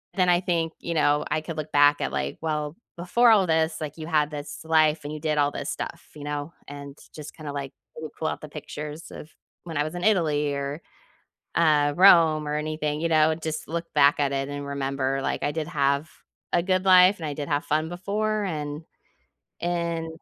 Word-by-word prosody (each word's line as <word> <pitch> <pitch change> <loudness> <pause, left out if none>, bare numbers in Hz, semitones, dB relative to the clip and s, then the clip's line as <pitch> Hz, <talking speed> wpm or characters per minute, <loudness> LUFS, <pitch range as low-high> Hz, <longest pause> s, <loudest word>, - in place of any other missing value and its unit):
then 185 -2 +3
I 175 0 +4
think, 165 -3 -1
you 170 - -4
know, 150 -2 +2
I 155 +1 +1
could 160 0 -7
look 155 0 -5
back 145 0 +5
at, - - -1
like, 70 0 -3
"Well, 150 -1 -2 0.2
before 230 +7 +4
all 195 -4 +4
this, 160 0 +1
like, 150 +1 -5
you 155 - -6
had 150 -2 +2
this 145 0 -7
life, 155 -1 +3
and 145 - -5
you 155 - -6
did 150 -1 -1
all 145 0 +3
this - - -5
stuff," - - -6
you 150 - -9
know, 145 +2 -4
and 140 0 -9 0.2
just 150 -1 -9
kinda, 150 -2 -7
like, 140 -1 -5 0.2
pull 155 0 -6
pull 160 - -2
out - - -3
the 155 - -9
pictures 150 +1 -8
of 155 - -10 0.3
when 165 -3 -6
I 145 - +2
was 155 +3 -5
in 175 - -5
Italy 150 -8 +2
or, 140 +3 -4 0.7
uh, 150 -3 +3
Rome 165 -5 +6
or 150 - -1
anything, 150 0 -2
you 165 - +1
know? 155 0 +4
Just 160 -1 -5
look 170 +1 -4
back 145 0 +5
at 140 -1 +1
it 135 0 -2
and 145 0 -5
remember, 135 -1 -2
like, - - -2
"I 145 - +1
did 155 0 -3
have 140 -1 +1 0.4
a 175 - +4
good 185 +1 +1
life, 185 +1 +7
and 165 - -6
I 145 - -3
did 145 0 -5
have 145 0 0
fun 155 +1 0
before. 210 +4 -1
And 150 -3 -4 0.8
and, 170 -1 -1
155 Hz, 215 wpm, -25 LUFS, 145-165 Hz, 0.8 s, life